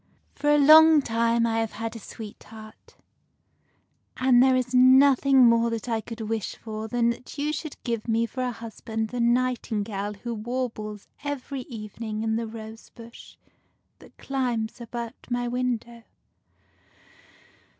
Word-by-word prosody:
For 295 +1 -1
a 295 - +5
long 310 +1 +7
time 230 0 +1
I 225 -1 0
have 225 -1 -2
had 225 +1 -5
a - - -7
sweetheart, 215 +1 -12 1.2
and 255 -1 +4
there 260 0 +5
is 255 0 -1
nothing 265 +1 +6
more 230 0 +4
that 230 0 -4
I 225 -2 -1
could 230 +1 -8
wish 220 -2 -3
for 220 -1 -6
than 235 +1 +1
that 250 +4 -10
you 295 +1 -1
should 310 0 -6
give 230 -2 -3
me 230 0 +1
for 255 +3 -6
a 250 -1 -1
husband 225 -1 -5
the 245 - -5
nightingale 225 -4 -1
who 235 +4 -6
warbles 220 -2 -5 0.2
every 280 -1 -4
even 215 -2 -9
ing 215 -1 -3
in 220 0 0
the 230 0 -2
rose 220 0 -10
bush 235 0 -13 0.6
that - - -18
climbs 245 -4 -3
about 235 +1 -7
my 245 0 -1
window." 240 -1 -3
235 Hz, 150 wpm, -25 LUFS, 225-255 Hz, 1.2 s, long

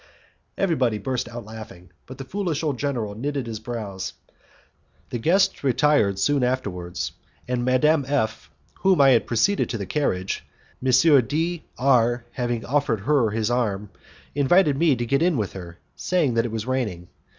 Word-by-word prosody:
Everybody 130 - +1
burst 125 +3 -3
out 120 -2 -8
laughing, 105 -5 -11 0.2
but 130 - -10
the 135 - -6
foolish 175 0 -3
old 145 -6 -1
general 120 -8 -2
knitted 140 +4 -3
his 110 -2 -5
brows. 110 -5 -5 1.0
The 120 - -2
guests 180 - +2
retired 130 -6 +3
soon 140 +7 +2
afterwards, 95 -9 -2 0.4
and 125 -1 -1
Madame 135 +4 +3
F, 135 -6 -1 0.3
whom 190 -3 +3
I 135 -1 +7
had 120 - +3
preceded 195 - +1
to 115 - -2
the 100 - -4
carriage, 95 -9 -1 0.4
M. 130 - +2 0.4
D 165 +2 -2
R 120 -2 +2
having 120 -2 -2
offered 130 -6 0
her 130 -1 +2
his 110 +2 -1
arm, 105 -5 -1 0.4
invited 145 +2 +3
me 150 -1 +3
to 120 0 -3
get 140 +4 +1
in 170 -3 +2
with 105 -4 -2
her, 90 -2 -9 0.2
saying 170 -9 0
that 115 0 +1
it 120 - -3
was 110 -1 -3
raining. 110 -10 -2
125 Hz, 160 wpm, -24 LUFS, 110-145 Hz, 1.0 s, I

